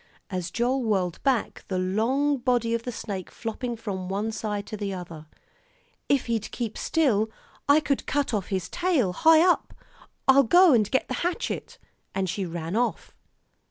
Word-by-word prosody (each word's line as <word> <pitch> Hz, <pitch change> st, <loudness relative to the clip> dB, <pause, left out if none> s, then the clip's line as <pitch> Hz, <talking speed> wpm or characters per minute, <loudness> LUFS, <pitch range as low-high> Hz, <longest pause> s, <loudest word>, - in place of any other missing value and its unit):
as 180 Hz, -2 st, -3 dB
Joel 245 Hz, +6 st, 0 dB
whirled 190 Hz, -6 st, 0 dB
back, 265 Hz, -5 st, 0 dB
the 190 Hz, -, -2 dB
long 235 Hz, +10 st, +1 dB
body 240 Hz, -2 st, +1 dB
of 230 Hz, -, 0 dB
the 245 Hz, -, -5 dB
snake 195 Hz, -6 st, -5 dB
flopping 235 Hz, +2 st, -4 dB
from 195 Hz, -5 st, -5 dB
one 205 Hz, +3 st, -1 dB
side 210 Hz, -2 st, -3 dB
to -, -, -6 dB
the 205 Hz, -1 st, -3 dB
other. 170 Hz, -4 st, -9 dB, 0.8 s
"If 280 Hz, -3 st, +2 dB
he'd 225 Hz, -3 st, -2 dB
keep 230 Hz, -3 st, -4 dB
still, 230 Hz, -10 st, +1 dB, 0.4 s
I 295 Hz, +2 st, +6 dB
could 280 Hz, -2 st, -1 dB
cut 285 Hz, -3 st, 0 dB
off 200 Hz, -4 st, -1 dB
his 190 Hz, -4 st, -2 dB
tail 315 Hz, -, +1 dB
high 325 Hz, -, +6 dB
up. 355 Hz, -, +1 dB, 0.5 s
I'll 270 Hz, +1 st, +7 dB
go 350 Hz, +6 st, +6 dB
and 215 Hz, -4 st, +3 dB
get 260 Hz, -, +1 dB
the -, -, -3 dB
hatchet 350 Hz, +6 st, -3 dB, 0.2 s
" -, -, -31 dB
and 190 Hz, -1 st, 0 dB
she 185 Hz, +1 st, -2 dB
ran 165 Hz, +2 st, -4 dB
off. 240 Hz, +2 st, -1 dB
225 Hz, 175 wpm, -26 LUFS, 195-270 Hz, 0.8 s, I'll